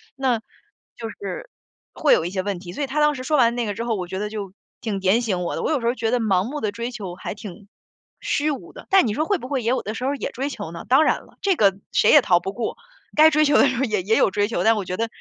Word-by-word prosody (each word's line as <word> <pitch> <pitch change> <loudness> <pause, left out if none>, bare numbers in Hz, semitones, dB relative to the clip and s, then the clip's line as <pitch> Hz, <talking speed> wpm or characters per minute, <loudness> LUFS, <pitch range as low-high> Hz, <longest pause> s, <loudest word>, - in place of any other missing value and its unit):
那 260 -4 +1 0.6
就 225 -1 -6
是 - - -7 0.4
会 300 - +3
有 160 - -1
一 175 - -3
些 190 -1 -1
问 200 -1 -2
题。 175 -1 -9
所 290 - -3
以 275 - -2
他 295 +4 -2
当 300 0 +4
时 255 - -6
说 300 +3 +1
完 235 -2 +4
那 240 -1 -1
个 205 - -2
之 230 - -3
后， 235 -1 -1
我 180 -3 -4
觉 190 +2 -4
得 210 +1 -3
就 205 -3 -6 0.3
挺 205 -4 -2
点 190 +5 +3
醒 195 -7 -1
我 175 - -2
的， - - -3
我 - - 0
有 295 -5 +1
时 230 - -1
候 240 - +1
觉 225 -3 -1
得 250 - +2
盲 195 -5 +2
目 285 +7 -5
地 210 - -1
追 235 +4 -5
求 200 -7 -6
还 - - -6
挺 205 -1 -10 0.5
虚 300 +2 0
无 280 - -7
的， - - -12
但 385 -9 +5
你 210 - -1
说 310 - 0
会 400 +1 0
不 255 - -7
会 265 -3 -2
也 230 - 0
有 255 - +1
的 215 +2 -5
时 250 - -4
候 275 - +1
也 285 - -3
追 270 +3 -3
求 165 -10 -6
呢？ 170 - -8
当 265 +5 +5
然 - - +1
了， - - -23
这 390 -2 +2
个 195 - +3
谁 - - +4
也 295 - +8
逃 175 -7 +3
不 190 +3 -5
过， 235 0 -3 0.4
该 310 +1 +7
追 305 0 +4
求 290 - +3
的 - - +6
时 260 -2 -1
候 260 - +1
也 215 -7 0
也 220 +4 +2
有 - - +4
追 205 +1 0
求， 205 -5 -1
但 225 +2 +5
我 205 -3 -3
觉 180 - -3
得 230 +4 -1
230 Hz, 335 characters per minute, -23 LUFS, 200-270 Hz, 0.6 s, 也